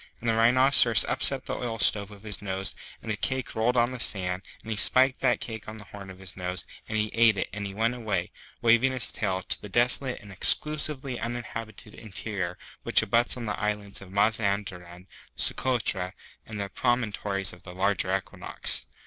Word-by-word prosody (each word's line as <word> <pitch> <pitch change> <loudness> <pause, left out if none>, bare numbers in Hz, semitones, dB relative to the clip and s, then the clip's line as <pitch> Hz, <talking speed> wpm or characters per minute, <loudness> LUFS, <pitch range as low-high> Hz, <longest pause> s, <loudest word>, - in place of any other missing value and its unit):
And 120 - -6
the 115 - +3
Rhinoceros 120 +1 +6
upset - - +5
the - - -3
oil 115 -2 -4
stove 100 0 +2
with 105 -1 -14
his 105 -2 -5
nose, 95 -1 -3 0.3
and 110 - -4
the - - -1
cake 130 +4 -3
rolled 120 +3 0
on 120 +1 +3
the 125 - -7
sand, 90 -4 +1 0.2
and 110 - -7
he - - -1
spiked 130 +5 +4
that 130 - +2
cake 110 -3 -7
on 110 - -8
the 105 - -8
horn 100 -1 -11
of 95 - -11
his 95 -1 -9
nose, 90 -1 -4 0.2
and 110 - -2
he 105 0 -1
ate 115 -2 +4
it, - - -2
and 100 0 -4
he 95 - -9
went 115 +3 +1
away, 105 -8 -3 0.3
waving 120 +3 +4
his 125 -4 0
tail, 95 -4 -2
to - - -3
the 105 - -9
desolate 125 +4 +2
and 105 -3 -13
Exclusively 140 +4 +2
Uninhabited 115 -3 -6
Interior 100 -4 -5 0.2
which - - +4
abuts 120 +2 +1
on 120 - -6
the 105 - -4
islands 105 -1 -3
of 100 - -12
Mazanderan, 100 -4 -1 0.3
Socotra, 110 -8 -1 0.3
and 100 -3 -6
Promontories 105 -5 -1
of 90 - -14
the 90 -1 -11
Larger 95 0 +1
Equinox. 95 - -1
105 Hz, 190 wpm, -27 LUFS, 100-120 Hz, 0.3 s, Rhinoceros